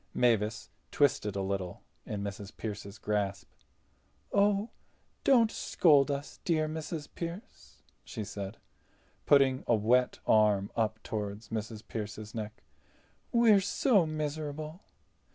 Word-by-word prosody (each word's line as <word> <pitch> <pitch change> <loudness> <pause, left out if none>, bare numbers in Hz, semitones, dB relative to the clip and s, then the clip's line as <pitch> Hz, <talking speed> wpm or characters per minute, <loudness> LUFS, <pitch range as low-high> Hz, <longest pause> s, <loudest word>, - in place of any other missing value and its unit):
Mavis 110 -3 +1 0.2
twisted 115 -8 +2
a 100 - -1
little 95 -2 -3 0.2
in 100 -1 -3
Mrs. 100 0 -7
Pearce's 100 -1 -6
grasp. 100 -1 -2 0.8
"Oh, 205 +2 +3 0.5
don't 235 -5 +5
scold 145 -5 +4
us, 140 0 -4
dear 155 -3 +1
Mrs. 155 -1 -5
Pearce," 170 - -8 0.2
she 110 - -5
said, 100 +1 -6 0.7
putting 135 -2 +5
a 120 - +5
wet 120 +4 +2
arm 105 -2 +4
up 110 -1 -1
toward 105 -1 -4
Mrs. 110 -1 -6
Pearce's 105 -1 -6
neck. 110 -4 -6 0.7
"We 235 -1 +5
are 200 -2 +6
so 200 - +3
miserable." 155 +2 -4
115 Hz, 115 wpm, -31 LUFS, 105-155 Hz, 0.8 s, are